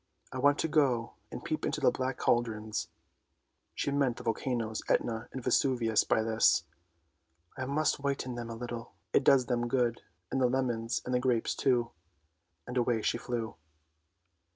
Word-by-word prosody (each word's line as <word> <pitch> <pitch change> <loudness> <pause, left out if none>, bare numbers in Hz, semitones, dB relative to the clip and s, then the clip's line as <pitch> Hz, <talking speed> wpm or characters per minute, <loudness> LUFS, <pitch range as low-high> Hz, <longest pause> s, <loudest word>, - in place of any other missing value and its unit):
" - - -33
I - - -3
want 145 0 +4
to - - 0
go 135 -7 +2 0.2
and - - -7
peep - - -2
into - - -1
the - - +4
black 130 0 -2
cauldrons! 110 -2 0 0.4
" - - -49
She 140 - -1
meant 140 -4 +1
the - - -8
volcanoes 115 -1 -1
Etna 115 -1 0
and 130 - -6
Vesuvius 120 -3 +2
by 110 - +2
this. 110 0 +3 0.4
" 80 +1 -40
I 130 - -3
must 150 +2 +1
whiten 140 -2 -2
them 120 -1 -5
a 115 - -5
little; 120 0 -6 0.2
it - - +4
does 130 -2 +5
them 120 -1 0
good, 120 -2 +1 0.3
and 135 - 0
the 125 - +5
lemons 120 -3 -1
and 125 - -2
the 125 - +3
grapes 125 -3 +1
too! 120 -3 +1 0.4
" 80 0 -48
And 125 - -5
away 120 -3 +1
she 120 - 0
flew. 115 -7 -4
120 Hz, 180 wpm, -31 LUFS, 115-130 Hz, 0.4 s, does